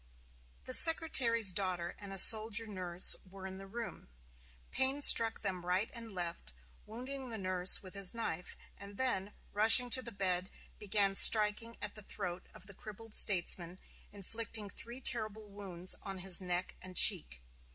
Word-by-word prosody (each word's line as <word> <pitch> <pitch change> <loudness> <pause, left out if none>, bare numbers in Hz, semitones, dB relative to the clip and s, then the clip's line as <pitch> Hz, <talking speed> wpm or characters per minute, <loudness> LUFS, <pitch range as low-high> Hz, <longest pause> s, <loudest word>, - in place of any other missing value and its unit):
The 255 - -4
Secretary's 250 - +4
daughter 180 -2 -4
and 200 -1 -12
a 195 - -7
soldier 220 +2 +7
nurse 185 -4 0
were 190 0 -15
in 190 0 -11
the 195 - -13
room. 230 - -10 0.6
Payne 270 +2 -1
struck 225 -4 +5
them 185 -3 -5
right 180 +4 -4
and 230 -2 -11
left, 170 - -9 0.3
wounding 255 +4 -9
the 225 - -6
nurse 185 -1 +2
with 185 - -13
his 200 -2 +3
knife, 180 -7 -8 0.2
and 200 0 -14
then, 210 -6 -4 0.2
rushing 225 +4 +4
to 260 - +4
the 235 - -8
bed, 185 -2 -5 0.3
began 200 -1 -2
striking 215 +3 +2
at 210 - -5
the 215 - -9
throat 180 -3 -9
of 185 - -16
the 200 - -13
crippled 215 +3 -12
statesman, 175 -3 0 0.3
inflicting 210 +1 -6
three 240 +3 -11
terrible 215 -4 -5
wounds 185 -3 -7
on 195 -2 -10
his 185 0 0
neck 180 0 -6
and 185 -1 -10
cheek. - - +3
200 Hz, 160 wpm, -31 LUFS, 185-225 Hz, 0.6 s, soldier